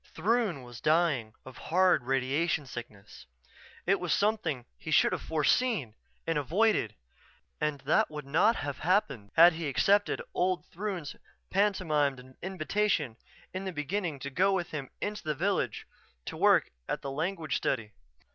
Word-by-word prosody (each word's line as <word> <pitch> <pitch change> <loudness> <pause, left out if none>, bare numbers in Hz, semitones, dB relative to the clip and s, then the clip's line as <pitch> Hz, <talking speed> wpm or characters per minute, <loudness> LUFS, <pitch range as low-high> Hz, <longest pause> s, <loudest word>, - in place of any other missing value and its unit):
Throon 200 - +1
was 120 -2 -11
dying 155 -9 +2
of 130 -2 -11
hard 180 -6 +4
radiation 140 +4 0
sickness. 110 - -10 0.6
It 195 +2 +3
was 180 -2 -2
something 175 - 0
he - - -9
should - - +4
have - - -2
foreseen 160 - +1 0.3
and 165 -2 0
avoided 165 - +1 0.6
and 150 -2 -1
that 135 +3 +2
would 150 -2 -7
not 180 +11 +3
have 145 -1 -4
happened 150 - 0
had 170 +1 +8
he 160 -1 -4
accepted 200 +9 +2
old 180 0 0
Throon's 185 -6 -4 0.4
pantomimed 150 -10 0
invitation, 185 - -1 0.4
in 185 +1 -4
the 190 - -2
beginning, 165 +1 -2
to 140 - -5
go 190 +7 +3
with 175 -3 -2
him 145 -4 -5
into 210 0 -3
the 155 -1 -2
village 190 +6 -1 0.4
to - - -5
work - - +4 0.2
at - - -2
the 140 - -4
language 160 +1 -2
study. 115 -5 -2
160 Hz, 145 wpm, -30 LUFS, 135-190 Hz, 0.6 s, had